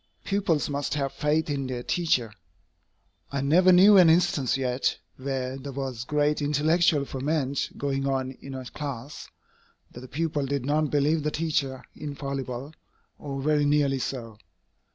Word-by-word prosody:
Pupils 195 -6 0
must 145 0 -2
have 140 -2 -2
faith 150 +2 0
in 140 -3 -2
their 125 -1 -4
teacher. 130 - 0 1.0
I 140 -1 -1
never 175 +7 +5
knew 195 +3 +8
an 180 -3 +8
instance 160 -6 +2
yet, 130 0 0 0.2
where 130 0 -3
there 140 +1 -7
was 130 -3 -4
great 150 +1 +1
intellectual 150 +1 +2
ferment 140 0 -1
going 135 -1 -1
on 130 -1 -1
in 135 -1 -8
a 130 -1 -6
class, 140 0 -7 0.6
that - - -10
the 130 - -10
pupils 145 0 -2
did 140 -3 -1
not 150 +1 +1
believe 150 +3 +2
the 150 - 0
teacher 150 -5 -1
infallible, 140 -2 -5 0.5
or 135 -2 -5
very 150 0 +2
nearly 145 -2 +2
so. 115 -5 -5
140 Hz, 150 wpm, -26 LUFS, 135-150 Hz, 1.0 s, knew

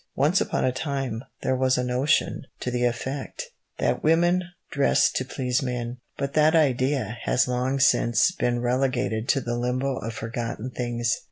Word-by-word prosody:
Once 150 +8 +3
upon - - 0
a 130 - +2
time 135 -4 -3 0.2
there 130 - +1
was 130 0 +2
a 125 - 0
notion 125 +5 +1 0.2
to 125 - -3
the 125 0 0
effect 130 - -3 0.3
that - - 0
women 175 +3 +3 0.3
dressed 140 -1 +3
to - - +1
please 130 0 -1
men, 125 -2 -3 0.2
but 140 0 -3
that 155 +1 +4
idea 130 -6 +1
has 130 - +2
long 125 +2 0
since 130 +3 +4
been 120 -8 -1
relegated 125 -2 0
to 135 - +4
the 120 -2 -3
limbo 125 +2 -1
of 115 - -4
forgotten 115 +1 -4
things. 120 -2 -1
130 Hz, 165 wpm, -25 LUFS, 120-140 Hz, 0.3 s, that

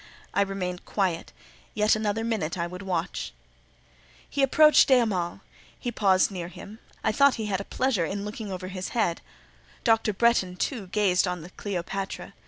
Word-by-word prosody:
I 200 - +2
remained 185 -2 -2
quiet; 185 -5 -1 0.4
yet 210 0 +4
another 215 0 -1
minute 210 -8 -1
I 170 - -1
would 180 +2 -7
watch. 185 -2 -3 0.9
He 280 - -2
approached 305 +3 +6
de 265 - +6
Hamal; 195 -6 0 0.4
he 245 - -3
paused 195 -3 +3
near 175 -3 -5
him; 205 +4 -11 0.2
I - - +2
thought 280 +5 +4
he 220 - -3
had 200 -2 -1
a - - -8
pleasure 255 -9 0
in 200 +3 -4
looking 210 -1 -6
over 185 0 -5
his 185 -1 -5
head; 175 -7 +1 0.6
Dr. 225 -2 +3
Bretton, 200 -4 +2
too, 210 +1 -3
gazed 190 -1 +2
on 180 -1 -3
the 175 - -11
Cleopatra. 195 0 -4
195 Hz, 170 wpm, -26 LUFS, 180-220 Hz, 0.9 s, approached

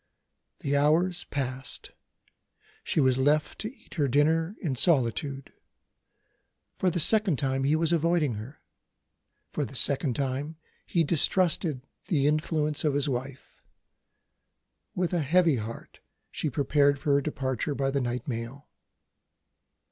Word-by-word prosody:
The 140 0 -1
hours 165 +5 +2
passed 130 -2 -5 0.9
she - - -1
was 130 -2 +3
left 150 +3 +1
to 215 - -4
eat 270 - -17
her 145 -3 +2
dinner 160 - +1
in 155 -7 -2
solitude. 135 -1 +1 1.3
For 185 - +2
the 175 - -2
second 205 -2 +4
time, 135 -1 -1
he 145 +3 +3
was 160 0 0
avoiding 165 -4 +1
her. 110 +8 -9 0.9
For 150 - -1
the 135 - -7
second 130 +2 +3
time, 140 +3 -3 0.3
he 170 - +2
distrusted 165 -2 +1 0.2
the 150 -8 +1
influence 150 0 0
of 150 -3 +1
his 145 0 +1
wife. 130 0 -6 1.3
With 180 0 -1
a 175 - +1
heavy 165 0 +3
heart 115 +1 -8 0.3
she 155 - -2
prepared 140 +1 +2
for 140 +1 0
her 140 - +3
departure 135 -1 -3
by 135 0 -1
the 140 0 0
night 125 +4 -3
mail. 120 +3 -6
145 Hz, 135 wpm, -27 LUFS, 135-160 Hz, 1.3 s, second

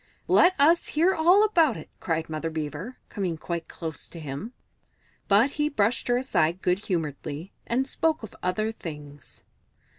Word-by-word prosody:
"Let 370 +1 +5
us 320 +4 +4
hear 340 +5 +3
all 360 +6 +5
about 330 - +3
it!" - - -9
cried 165 -1 -1
Mother 160 +1 -3
Beaver, 160 - -5
coming 185 -6 -2
quite 170 +1 -4
close 160 -2 -7
to 170 - -9
him. 150 - -6 0.8
But 215 +7 +4
he 300 0 0
brushed 225 -4 0
her 245 0 +3
aside 185 - 0
good 180 +1 +2
humouredly, 165 -2 -4 0.2
and 260 +3 +1
spoke 320 -2 0
of 220 - -9
other 215 +5 0
things. 150 -7 -10
200 Hz, 155 wpm, -26 LUFS, -, 0.8 s, Let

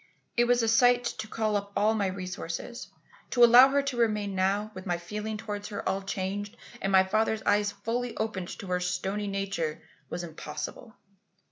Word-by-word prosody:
"It 240 -2 +4
was 240 -1 +3
a - - +1
sight 245 +2 +5 0.2
to 220 - -4
call 215 -1 -1
up 200 0 -3
all 210 +2 +3
my 205 -3 0
resources. 185 +5 -5 0.4
To 245 - +4
allow 245 +3 +9
her 280 +1 +2
to 275 -3 -3
remain 210 -4 +1
now, 195 +3 0
with 185 0 -8
my 175 -1 0
feelings 210 +5 -5
towards 205 -2 -4
her 205 - -5
all 190 +1 0
changed 195 +2 -4 0.2
and 195 - 0
my 190 -1 +6
father's 215 +3 0
eyes 205 0 +2
fully 230 +4 -3
opened 205 -5 -2
to - - -8
her 180 0 +1
stony 190 +3 -2
nature, 195 -6 -2 0.3
was 175 - -4
impossible. 155 +7 -7
205 Hz, 180 wpm, -28 LUFS, 190-225 Hz, 0.4 s, allow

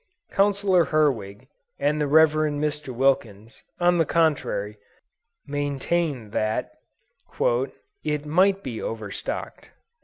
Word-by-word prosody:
Counsellor 195 -3 +3
Herwig, 130 -7 0 0.3
and 150 +2 0
the 150 - +1
Rev. 160 +2 +6
Mr. 150 -2 -1
Wilkens, 115 -4 -1 0.2
on 175 0 +3
the 165 - +4
contrary, 145 -10 0 0.7
maintained 145 -3 -2
that 110 0 -1 1.3
"it 150 -1 -2
might 190 +6 +3
be 120 -4 -5
overstocked." 110 -3 -5
145 Hz, 95 wpm, -24 LUFS, 120-160 Hz, 1.3 s, Rev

